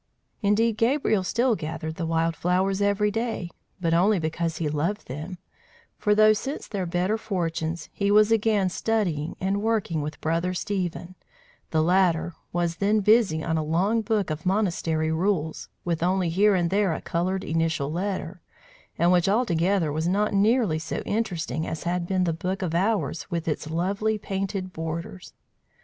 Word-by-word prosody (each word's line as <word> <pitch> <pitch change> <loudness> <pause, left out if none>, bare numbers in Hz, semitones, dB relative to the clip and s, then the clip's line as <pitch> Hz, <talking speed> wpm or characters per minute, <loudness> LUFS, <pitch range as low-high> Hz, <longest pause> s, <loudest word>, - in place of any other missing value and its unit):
Indeed, 215 +2 +2
Gabriel 230 -4 +2
still 235 +5 +1
gathered 160 -2 -5
the 165 0 -4
wild 165 0 +1
flowers 190 +4 +1
every 205 +1 +2
day, 225 -5 -3 0.3
but 165 -2 0
only 195 +5 +4
because 165 0 -2
he 160 - -1
loved 160 +8 -1
them; 155 +8 -6 0.6
for 210 0 +3
though, 215 0 +6
since 270 +7 -4
their 190 -4 -3
better 180 +6 0
fortunes, 170 -5 -3
he 200 0 0
was 210 +1 +5
again 215 -3 +2
studying 180 -7 -1
and 195 +2 0
working 215 -8 0
with 150 +1 -5
Brother 170 +3 -1
Stephen, 180 -2 -3 0.6
the 155 -1 +2
latter 175 -1 +2 0.2
was 170 -1 -1
then 210 +2 +2
busy 205 -7 +3
on 160 0 0
a - - -1
long 185 +9 +1
book 210 -5 0
of 155 +1 -4
monastery 170 -5 0
rules, 160 -2 -1 0.2
with 170 -2 -1
only 180 0 +1
here 200 +4 +4
and 175 -1 +1
there 195 -4 +2
a - - -4
coloured 185 +3 -1
initial 160 -3 -1
letter, 185 0 -3 0.6
and 170 +1 +3
which 180 +1 +3
altogether 190 -6 +2
was 160 +3 -1
not 205 +4 +1
nearly 205 -4 +3
so 160 - -4
interesting 170 - -2
as 160 - -4
had 175 0 -1
been 185 -1 +1
the 170 -2 +1
book 185 +5 -3
of 170 -3 -2
hours 180 -4 0
with 170 -3 -3
its 155 0 -2
lovely 200 +6 0
painted 195 -2 -3
borders. 165 +3 -6
180 Hz, 165 wpm, -25 LUFS, 165-205 Hz, 0.6 s, though